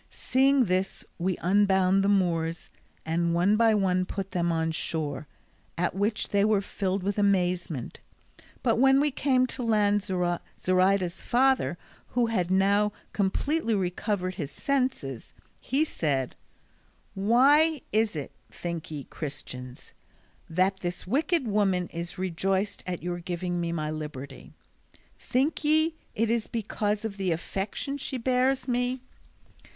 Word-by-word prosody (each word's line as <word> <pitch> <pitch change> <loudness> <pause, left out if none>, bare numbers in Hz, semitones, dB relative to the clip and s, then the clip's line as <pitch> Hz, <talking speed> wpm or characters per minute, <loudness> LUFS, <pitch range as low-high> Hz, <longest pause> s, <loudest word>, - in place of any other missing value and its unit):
Seeing 265 0 +3
this 185 0 -1
we 180 +1 0
unbound 190 0 +3
the 200 - +2
Moors, 170 -4 0 0.3
and 170 +1 0
one 185 +5 +3
by 225 0 +4
one 185 -2 +2
put 195 0 -5
them 175 -1 0
on 160 0 0
shore, 155 -3 -3 0.5
at 175 - 0
which 205 +3 -1
they 200 0 +2
were 210 -1 +3
filled 195 -1 -2
with 200 +1 -1
amazement; 180 - 0 0.6
but - - +2
when 270 +1 +6
we 295 +1 +2
came 260 -1 +2
to 255 +1 -5
land 210 -3 +2
Zoraida's 185 0 0
father, 260 -7 +2 0.3
who 245 -1 +1
had 190 -7 0
now 200 +2 +3 0.2
completely 230 +5 0
recovered 185 0 -1
his 160 -7 -5
senses, 255 - -2 0.3
he 280 +5 +1
said: 140 - -1 0.8
"Why 275 +9 +4
is 215 -3 +2
it, 145 -3 -5 0.2
think 170 -2 -5
ye, 150 -3 -5
Christians, 130 -4 -8 0.6
that 185 +3 +2
this 175 -2 -5
wicked 290 - +1
woman 195 -4 +1
is 170 +1 -6
rejoiced 190 +2 -1
at 180 -2 -4
your 175 0 -3
giving 175 0 -3
me 170 0 -2
my 155 -2 -2
liberty? 140 -3 -7 0.6
Think 270 +6 0
ye 315 +2 +3 0.2
it 225 +1 +1
is 230 -2 0
because 210 -1 -2
of 205 -2 -4
the 190 -2 0
affection 195 - -3
she 265 - -3
bears 255 +2 +1
me? 250 +1 0
195 Hz, 135 wpm, -27 LUFS, 175-230 Hz, 0.8 s, when